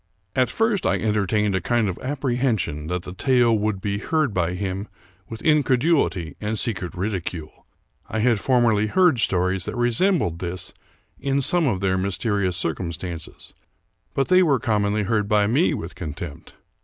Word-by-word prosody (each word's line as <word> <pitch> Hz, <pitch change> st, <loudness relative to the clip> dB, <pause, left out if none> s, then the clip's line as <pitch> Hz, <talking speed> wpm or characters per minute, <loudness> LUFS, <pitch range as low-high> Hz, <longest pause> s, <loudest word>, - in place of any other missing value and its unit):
At 130 Hz, -1 st, +2 dB
first 225 Hz, -3 st, +1 dB
I 95 Hz, -, +2 dB
entertained 105 Hz, 0 st, +1 dB
a 95 Hz, -, 0 dB
kind 120 Hz, +3 st, +1 dB
of 90 Hz, -, -4 dB
apprehension 125 Hz, -, -1 dB
that 90 Hz, +1 st, -3 dB
the 90 Hz, -, -8 dB
tale 120 Hz, +1 st, +3 dB
would 105 Hz, -2 st, -1 dB
be 100 Hz, +1 st, -2 dB
heard 155 Hz, +2 st, 0 dB
by 90 Hz, -1 st, 0 dB
him 95 Hz, +2 st, -3 dB, 0.4 s
with 115 Hz, -, -8 dB
incredulity 140 Hz, -, +2 dB
and 105 Hz, +1 st, -2 dB
secret 105 Hz, -6 st, -3 dB
ridicule. 90 Hz, -4 st, -5 dB, 0.4 s
I -, -, -3 dB
had 115 Hz, -1 st, +2 dB
formerly 115 Hz, -4 st, +2 dB
heard 175 Hz, -, +3 dB
stories 95 Hz, -2 st, 0 dB
that -, -, -5 dB
resembled 120 Hz, -, +2 dB
this 90 Hz, 0 st, -4 dB, 0.5 s
in 140 Hz, 0 st, 0 dB
some 175 Hz, +2 st, +3 dB
of 100 Hz, -7 st, 0 dB
their 95 Hz, -1 st, +1 dB
mysterious 100 Hz, -1 st, 0 dB
circumstances; 85 Hz, -1 st, -5 dB, 0.6 s
but 135 Hz, -, 0 dB
they 185 Hz, 0 st, +6 dB
were 150 Hz, -7 st, +3 dB
commonly 105 Hz, -2 st, 0 dB
heard 105 Hz, 0 st, 0 dB
by 105 Hz, -1 st, +3 dB
me 130 Hz, -, +2 dB
with 85 Hz, +2 st, -6 dB
contempt. 75 Hz, -2 st, -8 dB
105 Hz, 155 wpm, -23 LUFS, 90-125 Hz, 0.6 s, they